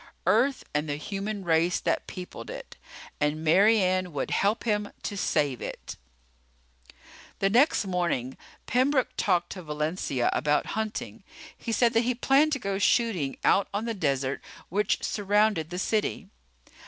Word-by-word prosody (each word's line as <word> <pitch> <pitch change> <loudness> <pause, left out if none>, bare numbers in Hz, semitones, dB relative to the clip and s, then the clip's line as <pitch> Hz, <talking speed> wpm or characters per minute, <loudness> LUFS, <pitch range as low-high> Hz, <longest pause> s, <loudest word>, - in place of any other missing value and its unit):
Earth 235 +9 +2
and 150 +1 -1
the 145 - -1
human 200 +6 -4
race 165 +1 +2
that - - -1
peopled 180 -1 -8
it. - - -8 0.4
And 150 +1 0
Mary 200 +8 +5
Ann 185 -1 +1
would 140 - -3
help 205 +4 +1
him 210 -2 -1
to 205 - -3
save 145 -8 0
it. - - -6 1.4
The 195 0 +1
next 245 -1 +4
morning 170 -9 -1 0.3
Pembroke 260 +1 +2
talked 175 -3 +1
to 185 - -6
Valencia 150 -4 -1
about 150 0 +1
hunting. 220 0 -4 0.3
He 230 - -5
said 235 +1 +3
that 225 - +4
he 245 +1 0
planned 275 +5 +3
to - - +1
go 195 -4 -2
shooting 200 - +1
out 195 - +4
on 210 +3 -1
the 230 - -2
desert 140 -7 -1 0.3
which 205 +3 0
surrounded 205 -5 +1
the 180 - -5
city. 210 0 -1
195 Hz, 150 wpm, -27 LUFS, 160-220 Hz, 1.4 s, Mary